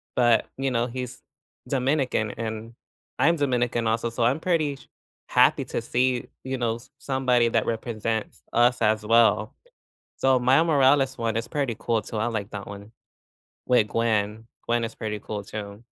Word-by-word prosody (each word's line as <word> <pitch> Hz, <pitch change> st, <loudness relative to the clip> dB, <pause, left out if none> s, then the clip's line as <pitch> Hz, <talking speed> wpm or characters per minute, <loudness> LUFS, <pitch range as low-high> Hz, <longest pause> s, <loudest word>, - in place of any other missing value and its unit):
But 120 Hz, -2 st, +4 dB
you 135 Hz, 0 st, 0 dB
know, 120 Hz, 0 st, +1 dB
he's 125 Hz, 0 st, -6 dB, 0.5 s
Dominican 130 Hz, -5 st, 0 dB
and 110 Hz, 0 st, -5 dB, 0.5 s
I'm 170 Hz, +3 st, +4 dB
Dominican 120 Hz, -4 st, 0 dB
also, 115 Hz, +1 st, 0 dB
so 115 Hz, 0 st, -1 dB
I'm 125 Hz, +6 st, +2 dB
pretty 160 Hz, -5 st, 0 dB
sh 135 Hz, -, -18 dB, 0.4 s
happy -, -, +4 dB
to -, -, -3 dB
see, 125 Hz, 0 st, 0 dB, 0.2 s
you 130 Hz, 0 st, -3 dB
know, 115 Hz, -2 st, 0 dB
s 120 Hz, +3 st, -13 dB
somebody 125 Hz, -3 st, +2 dB
that 115 Hz, -1 st, +1 dB
represents 110 Hz, -1 st, -3 dB
us 120 Hz, +1 st, +3 dB
as 110 Hz, 0 st, +2 dB
well. 110 Hz, -1 st, +3 dB, 0.6 s
So 135 Hz, -1 st, +3 dB
Mile 130 Hz, +5 st, +4 dB
Morales 135 Hz, -3 st, +3 dB
one 115 Hz, -2 st, -1 dB
is 115 Hz, 0 st, -3 dB
pretty 135 Hz, -3 st, -2 dB
cool 115 Hz, -2 st, 0 dB
too, 110 Hz, -, -6 dB
I 110 Hz, +2 st, 0 dB
like 105 Hz, -4 st, -3 dB
that 100 Hz, -1 st, -6 dB
one 100 Hz, +1 st, -10 dB, 0.7 s
with 125 Hz, -4 st, +3 dB
Gwen. 110 Hz, -1 st, 0 dB, 0.2 s
Gwen 120 Hz, 0 st, +1 dB
is 115 Hz, -, -4 dB
pretty 105 Hz, -1 st, -4 dB
cool 105 Hz, -1 st, -5 dB
too. 100 Hz, +1 st, -8 dB
115 Hz, 165 wpm, -25 LUFS, 110-130 Hz, 0.7 s, But